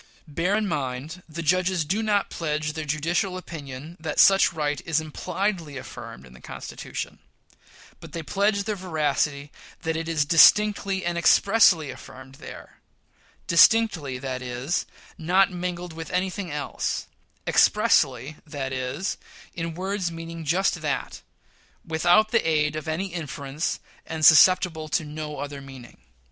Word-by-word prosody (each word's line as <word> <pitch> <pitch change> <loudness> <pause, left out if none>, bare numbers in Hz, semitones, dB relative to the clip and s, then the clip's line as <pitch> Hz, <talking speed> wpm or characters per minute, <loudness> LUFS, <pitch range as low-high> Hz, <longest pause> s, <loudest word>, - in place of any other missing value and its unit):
Bear 165 +6 0
in 215 -1 -1
mind, 145 +2 -4
the 165 +2 -6
judges 185 0 +1
do 195 +8 -1
not 205 -2 0
pledge 155 -1 -2
their 160 0 -5
judicial 170 +6 -1
opinion 150 -3 -8
that 160 -2 -4
such 195 -2 +6
right 150 -3 -2
is 160 -1 +1
impliedly 165 0 -3
affirmed 65 - -9
in 65 - -16
the 65 - -16
Constitution; - - -7 0.8
but - - -12
they 165 - -5
pledge 200 +4 +1
their 210 +1 -2
veracity 150 -5 -1 0.3
that 160 0 -1
it 165 0 -3
is 155 -3 +1
"distinctly 195 +4 +5
and 170 0 -1
expressly" 175 -4 +4
affirmed 130 +1 -13
there - - -11 0.7
"distinctly," 170 - +4
that 130 -1 -5
is, 125 +6 -2 0.3
not 185 +4 +3
mingled 180 -1 -5
with 160 -1 -7
anything 185 +1 -2
else; 150 -1 -3 0.4
"expressly," 150 - +2
that 140 -3 -5
is, 130 +8 -3 0.4
in 165 -1 -4
words 190 0 -2
meaning 165 0 -7
just 175 +2 +1
that, 145 -3 -3 0.6
without 175 +7 +3
the 230 - +3
aid 155 -2 +1
of 155 +1 -5
any 175 +4 -3
inference, 150 -2 -4 0.3
and 160 -1 -1
susceptible 165 0 +6
of 155 - 0
no 150 0 -6
other 145 -1 -6
meaning. 135 -4 -12
160 Hz, 140 wpm, -25 LUFS, 145-185 Hz, 0.8 s, such